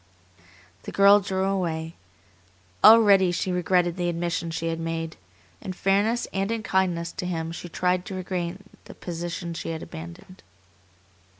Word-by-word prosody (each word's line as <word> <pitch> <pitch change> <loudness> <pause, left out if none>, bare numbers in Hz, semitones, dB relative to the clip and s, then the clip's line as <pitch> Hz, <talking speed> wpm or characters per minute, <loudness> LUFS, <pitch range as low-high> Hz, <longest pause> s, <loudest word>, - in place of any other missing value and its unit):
The - - -8
girl 200 +1 +6
drew 190 -1 -2
away. 170 -4 -2 0.9
Already 200 -5 +7
she 180 +2 -2
regretted 180 0 +1
the 175 -1 0
admission 170 0 -2
she 165 0 -3
had 165 0 -3
made. 165 -1 -4 0.5
In 185 - -5
fairness 205 +6 +1
and 195 +1 -1
in 225 -1 -2
kindness 175 -4 0
to 180 - -5
him 165 -2 -3
she 175 +1 -7
tried 180 +1 0
to 190 - -6
regain 185 0 -4 0.2
the - - -12
position 170 0 -5
she 165 - -5
had 160 -1 -4
abandoned. 85 - -10
180 Hz, 145 wpm, -25 LUFS, 170-190 Hz, 0.9 s, Already